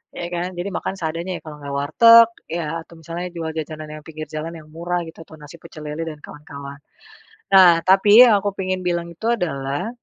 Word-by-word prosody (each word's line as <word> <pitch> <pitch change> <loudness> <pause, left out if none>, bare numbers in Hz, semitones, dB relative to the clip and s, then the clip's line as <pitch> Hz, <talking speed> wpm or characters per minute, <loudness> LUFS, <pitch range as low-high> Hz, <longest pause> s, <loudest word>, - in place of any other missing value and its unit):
Ya 175 - -5
kan. 175 +1 -2
Jadi 175 +3 -3
makan - - -3
seadanya 165 +3 -4
ya - - -13
kalau 155 -1 -9
ga 140 - -6
warteg 230 +12 +6 0.2
ya 165 -1 -3
atau 170 - -17
misalnya 170 +2 -5
jual 165 -1 -4
jajanan 155 0 -6
yang - - -19
pinggir 155 -1 -8
jalan 155 +2 -5
yang 155 -1 -14
murah 175 +2 -3
gitu 160 - -13
atau 160 - -14
nasi 150 +3 -12
pecel 155 - -12
lele 150 +2 -4
dan 155 -1 -10
kawan-kawan. 140 -1 -10 0.7
Nah, 180 -3 +7
tapi 205 +4 +7
yang 215 - +5
aku 205 - 0
pingin 185 -1 -3
bilang 170 -1 -1
itu 170 +6 -8
adalah 160 -5 -2
165 Hz, 205 wpm, -21 LUFS, 155-180 Hz, 0.7 s, Nah